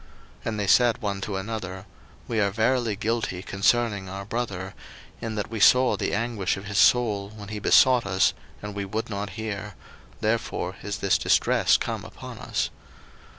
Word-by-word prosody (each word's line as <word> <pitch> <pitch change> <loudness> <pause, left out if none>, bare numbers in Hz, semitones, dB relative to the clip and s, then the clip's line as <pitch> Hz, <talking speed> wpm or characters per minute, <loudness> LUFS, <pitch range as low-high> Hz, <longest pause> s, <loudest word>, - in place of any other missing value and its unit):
01:042:021 - - -23
And 110 -2 -2
they 100 - 0
said 120 +3 +4
one 100 -4 -3
to 100 0 -3
another, 95 -2 -5 0.4
We 115 - -1
are 100 -1 +3
verily 115 +1 +1
guilty 110 -3 -2
concerning 100 0 +1
our 100 +1 -6
brother, 100 -4 -4 0.5
in 110 -1 -4
that 105 +1 -3
we 115 - -3
saw 125 +4 +6
the - - -1
anguish 105 -4 -1
of 100 - -8
his 100 0 -1
soul, 105 -5 +3
when 105 -1 -10
he 105 -1 -4
besought 125 +3 +5
us, 95 +1 +3 0.3
and 105 0 -5
we 100 0 -3
would 110 +3 -4
not 100 0 -4
hear; 105 -2 -5 0.4
therefore 105 -4 -1
is 100 0 -4
this 100 -1 +2
distress - - +3
come - - -4
upon - - -10
us. - - -2
105 Hz, 175 wpm, -25 LUFS, 100-115 Hz, 0.5 s, saw